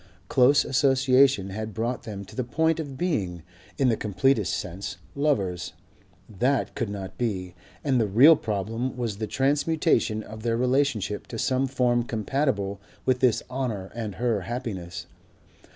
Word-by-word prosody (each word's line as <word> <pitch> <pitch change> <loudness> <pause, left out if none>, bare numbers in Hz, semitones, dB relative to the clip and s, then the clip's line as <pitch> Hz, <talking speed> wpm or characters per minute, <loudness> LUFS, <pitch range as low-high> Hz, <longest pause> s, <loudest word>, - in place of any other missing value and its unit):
Close 135 +3 +5
association 130 -5 +3
had 110 0 -5
brought 120 +3 -2
them 100 -2 -6
to - - -14
the 130 - -1
point 160 +7 +1
of 140 -4 -5
being, 95 - -1 0.3
in 135 - +3
the 115 - +3
completest 105 +2 +1
sense, 95 +2 -5 0.2
lovers; 95 - 0 0.5
that 125 +6 0
could - - -2
not 95 -2 -7
be; 95 -7 -2 0.3
and 130 -4 +2
the 110 - +1
real 130 +11 +7
problem 115 +2 -3
was 115 -5 -2
the 110 - -2
transmutation 135 -5 +1
of 110 +1 -10
their 115 0 0
relationship 125 -5 0
to 115 - -6
some 130 +3 +1
form 125 -2 +2
compatible 110 -4 -1 0.2
with 130 -1 +2
his 125 -4 +3
honour 120 -7 -3
and 110 -4 -5
her 115 -4 0
happiness. 105 -5 -5
120 Hz, 150 wpm, -26 LUFS, 100-135 Hz, 0.5 s, real